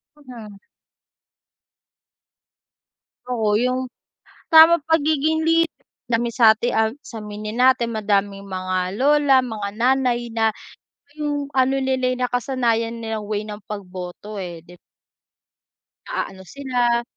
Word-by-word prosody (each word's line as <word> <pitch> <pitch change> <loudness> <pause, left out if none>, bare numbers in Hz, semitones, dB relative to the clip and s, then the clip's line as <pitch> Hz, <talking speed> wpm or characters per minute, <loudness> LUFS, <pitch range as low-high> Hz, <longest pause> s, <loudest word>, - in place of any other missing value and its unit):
Mhm. 235 -8 -12 2.7
Oo 220 -4 +1
yung, 255 +1 -1 0.6
tamang 320 0 +8
pagiging 315 0 +1
leader 330 0 +3 0.4
dami 235 +1 +1
sati 230 -1 +4
ag 220 -2 +1
sa 225 -7 -9
aminin 210 +1 -6
natin 250 -2 +4
madaming 200 -1 0
mga 185 -1 -3
lola 285 -1 +4
mga 220 -5 -4
nanay 240 +1 +1
na 225 -1 +1 0.7
yung 290 -1 -2
ano 265 0 +2
nila'y 260 -1 0
nakasanayan 245 -2 -1
nilang 220 -2 -4
way 210 -1 -2
ng 210 -1 -8
pagboto 195 +1 -7
eh, 175 -3 -7
di 175 +1 -16 1.3
Naaano 195 - -5
sila, 245 -3 0
235 Hz, 105 wpm, -21 LUFS, 210-265 Hz, 2.7 s, tamang